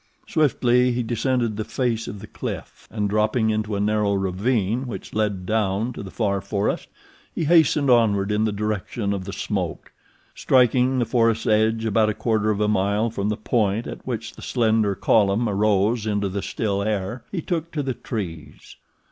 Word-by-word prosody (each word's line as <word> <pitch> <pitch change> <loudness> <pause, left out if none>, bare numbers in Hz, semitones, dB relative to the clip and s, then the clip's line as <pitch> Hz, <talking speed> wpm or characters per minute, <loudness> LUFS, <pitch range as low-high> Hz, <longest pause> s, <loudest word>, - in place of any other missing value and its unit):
Swiftly 125 -4 +3
he 120 0 -1
descended 120 -1 0
the 110 - -1
face 115 -1 -2
of 100 - -7
the - - -8
cliff, - - -7
and, 105 -2 -1
dropping 110 +2 +1
into 110 -1 -1
a - - -1
narrow 105 0 +1
ravine 100 +5 0
which 100 -6 -7
led 105 -4 -1
down 110 +3 0
to - - -7
the 95 - -7
far 100 -2 -1
forest, 100 0 -2 0.5
he - - -1
hastened 155 -3 +4
onward 105 -5 +3
in 105 +1 +1
the 110 - +1
direction 105 0 -2
of 95 -2 -4
the 100 - -5
smoke. 95 -4 -4 0.4
Striking 130 0 +3
the 120 - +2
forest's 115 -1 +1
edge 110 +1 +2
about 110 0 +2
a 105 - -2
quarter 110 -2 0
of 105 -1 0
a 105 - +2
mile 105 +2 +1
from 100 -1 -2
the 105 - -1
point 110 -1 0
at - - -7
which 115 -2 -4
the - - -13
slender 110 -4 +1
column 105 +3 +2
arose 105 +2 +1
into 105 -2 0
the 100 +1 -3
still 100 -1 -2
air, 105 +3 -2
he 190 - -2
took 170 -2 -2
to 150 -3 -2
the 130 -1 -2
trees. 95 - -7
110 Hz, 180 wpm, -23 LUFS, 100-120 Hz, 0.5 s, hastened